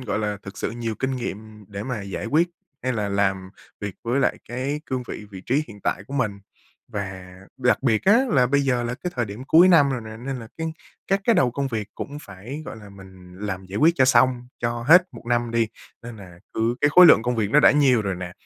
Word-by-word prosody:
gọi 110 -4 -2
là, 105 -1 -2
thực 100 - -10
sự - - -2
nhiều 115 -1 -4
kinh 130 +3 -2
nghiệm 110 -3 -7
để 100 0 -6
mà 115 -4 -4
giải 100 +2 -5
quyết 160 +7 +2 0.3
hay 130 0 0
là 105 -3 -2
làm 95 -1 0 0.3
việc 100 -2 -5
với 125 +4 +1
lại - - +1
cái 135 +5 -3
cương 130 -1 -2
vị, 105 - -7
vị 95 -2 -9
trí 145 +5 +1
hiện 105 -2 -12
tại 95 - -2
của 140 - -8
mình. 105 -7 -1 0.5
Và 95 -2 -6 0.2
đặc 125 0 +1
biệt 115 -5 +1
á, 230 +7 +5
là 130 - +3
bây 140 +2 +2
giờ 125 -3 0
là 120 +1 -3
cái 175 +7 -5
thời 120 - +1
điểm 105 +5 -8
cuối 170 +6 +6
năm 145 -6 +5
rồi 125 - -2
nè, 110 -1 -9
nên 130 +3 -5
là 115 -2 -10
cái 160 0 -3 0.3
các 195 +1 +1
cái 230 - +4
đầu 125 - +3
công 140 +2 -2
việc 110 -4 -4
cũng 145 +1 -6
phải, 110 +10 -9
gọi - - -7
là, 105 -2 -12
mình 95 -2 -14
làm 95 -2 -5
giải 95 +2 -7
quyết 165 +2 +5
cho 130 - +5
xong 125 -1 +3
cho 120 0 -2
hết 175 +8 +7
1 120 - -11
năm 120 -1 0
đi. 115 0 +1 0.4
Nên 115 -1 -9
là 90 -4 -13
cứ 115 +2 0
cái 145 - +4
khối 180 +3 +9
lượng 115 - +7
công 125 0 -1
việc 105 -2 0
nó 150 - +5
đã - - +7
nhiều 130 -6 +3
rồi 95 -2 -2
nè, 90 0 -7
120 Hz, 250 wpm, -23 LUFS, 100-135 Hz, 0.5 s, khối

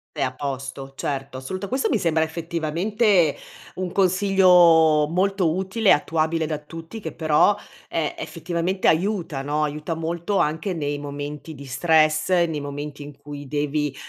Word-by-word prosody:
È 150 - -3
a 130 -1 -1
posto, 135 0 -6
certo. 135 -1 -4
Assoluta 185 +10 -5
questo 260 +6 0
mi 230 - +2
sembra, 160 -3 +2
effettivamente, 170 +3 +1 0.4
un 185 -1 -3
consiglio 180 -5 +5
molto 185 -2 +1
utile, 190 +3 +1
attuabile 160 +1 +1
da 155 -1 -2
tutti 165 +7 -9
che - - -6
però, 155 +5 +3 0.3
ehm, 155 -3 -2
effettivamente 170 +3 -2
aiuta, 170 -5 0
no, 150 +2 0
aiuta 150 +2 -3
molto 170 +4 -2
anche 160 +5 0
nei 145 -3 -2
momenti 145 +2 -6
di 140 -1 -10
stress, 155 +3 +2
nei 170 -4 +2
momenti 145 +1 -6
in 145 0 -10
cui 145 0 -9
devi, 145 0 -1
160 Hz, 145 wpm, -23 LUFS, 145-180 Hz, 0.4 s, consiglio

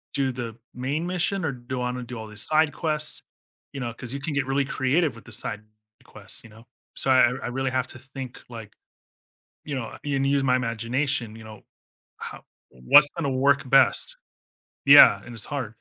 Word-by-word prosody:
do 135 -1 +1
the 120 -2 -6 0.2
main 140 +6 -3
mission 185 +2 -1
or 150 - 0
do 125 0 -7
I - - -1
wanna 125 0 -5
do 120 0 -8
all 110 - -7
these 105 -1 -5
side 155 +3 +3
quests? 155 -1 -1 0.5
You 140 - -6
know, 120 -2 -4
'cause 120 +2 -7
you - - -4
can 150 +2 -3
get 140 -1 0
really 135 +1 +1
creative 140 +3 +1
with 115 - -14
the 120 - -13
side 105 0 -3 0.4
quests, 105 0 -6
you 115 - -14
know? 115 +2 -17 0.3
So 135 - +2
I 130 -2 +5
I - - -3
really 135 +2 -2
have 130 -1 0
to 130 - -9
think, 135 -1 -9
like, 115 -3 -10 0.9
you 150 - -5
know, 125 -4 -5
and 135 -2 0
use 140 0 +2
my 125 -1 +3
imagination, 115 0 -2
you 110 - -12
know? 110 -1 -12 0.5
How - - -9 0.3
what's 135 - +5
gonna 160 -4 -2
work 135 0 +2
best? 135 - +4 0.7
Yeah, 145 +1 +9
and 120 - -10
it's 110 - -1
hard. 130 -7 -5
130 Hz, 195 wpm, -25 LUFS, 115-140 Hz, 0.9 s, Yeah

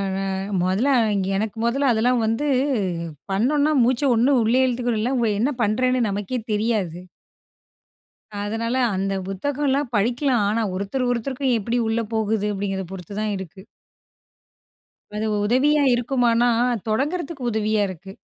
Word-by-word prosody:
ந - - -2 0.4
மொதல்ல 190 +9 +1
அ - - +4
இங் 195 -2 0
எனக்கு 215 +2 -3
மொதல்ல 265 +3 +2
அதெல்லாம் 235 +1 +2
வந்து, 225 +7 0 0.9
பண்ணோன்னா 285 +9 +2
மூச்சை 255 +3 +2
ஒண்ணு 250 +3 +3
உள்ளயே 250 +4 +3
இழுத்துக்கனும் 240 -3 -1
இல்ல 245 +4 0
அவுங்க 235 -3 +1
என்ன 280 +5 +1
பண்ணுறேன்னு 255 +4 +1
நமக்கே 205 +5 -3
தெரியாது. 210 -6 -1 1.5
அதனால, 230 +4 -2 0.2
அந்த 195 +1 -1
புத்தகம்லாம் 275 +6 -1
படிக்கலாம். 240 +3 +1
ஆனா, 225 +2 0
ஒருத்தர் 225 +7 -2
ஒருத்தருக்கும் 255 +2 -1
எப்புடி 230 +3 -1
உள்ள 225 +1 0
போகுது, 220 -1 0
அப்டிங்கிறத 195 -1 -3
பொறுத்து 190 +1 -8
தான் 215 -1 -1
இருக்கு. 190 0 -9 1.5
அது 215 +1 -2 0.2
உதவியா 285 +6 +3
இருக்குமானா? 240 -1 +2 0.4
தொடங்குறதுக்கு 285 +5 -2
உதவியா 215 -1 +1
இருக்கு. 185 +1 -9
230 Hz, 130 wpm, -22 LUFS, 205-255 Hz, 1.5 s, அ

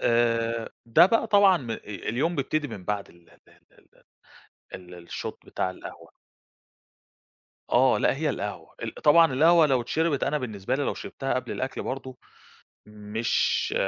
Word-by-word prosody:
آآ، 115 -1 +1 0.2
ده 115 +9 +6
بَقى 230 +3 +1
طبعًا 200 -3 +5
م 125 -8 -7
أ - - -1
اليوم 120 - -2
بيبتدي 145 +2 -1
من 100 -6 -9
بعد 105 0 -3
ال 85 -1 -23
ال - - -23 0.3
ال - - -25 0.9
ال 90 -1 -10
ال 85 -1 -14
الshot - - -5
بتاع 95 - -2
القهوة. 95 - -11 1.6
آه 130 +1 +4
لأ، - - +1
هي 155 0 0
القهوة 105 -4 -6
ال - - -5
طبعًا 165 0 +5
القهوة 160 +4 +5
لو 130 -3 +2
اتشربت، 155 +4 0
أنا 150 +2 0
بالنسبة 110 -4 -3
لي 145 - -1
لو - - -1
شربتها 135 0 -4
قبل 130 -1 -3
الأكْل 130 +1 -4
برضه 130 -1 -6 0.7
مش 105 +2 -1
130 Hz, 155 wpm, -26 LUFS, 105-150 Hz, 1.6 s, ده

